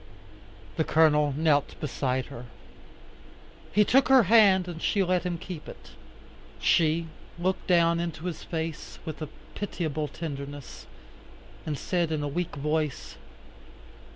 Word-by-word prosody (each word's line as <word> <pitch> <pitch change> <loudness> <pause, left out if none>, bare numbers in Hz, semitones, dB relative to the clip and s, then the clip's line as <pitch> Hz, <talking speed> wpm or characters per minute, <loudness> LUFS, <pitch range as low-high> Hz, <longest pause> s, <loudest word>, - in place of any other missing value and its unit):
The 160 - +3
Colonel 150 -2 +4
knelt 150 -3 +1
beside 130 -3 -1
her. 120 - -8 1.3
He 210 0 +4
took 265 +5 +4
her 265 -2 +7
hand 195 -3 +5
and 170 -2 -6
she 200 - +2
let 180 -1 +1
him 175 -1 -2
keep 165 -2 -8
it. - - -12 0.7
She 165 0 +3 0.3
looked 185 +2 -1
down 170 -2 +4
into 170 -1 -4
his 175 -3 -4
face, 160 -2 -5
with 155 0 -6
a 155 - -4 0.2
pitiable 155 -7 -3
tenderness, 145 -2 -7 0.8
and 150 -2 -2
said 175 0 -1
in 155 -2 -1
a - - -1
weak 170 +4 -3
voice. 150 0 -2
160 Hz, 130 wpm, -27 LUFS, 150-180 Hz, 1.3 s, her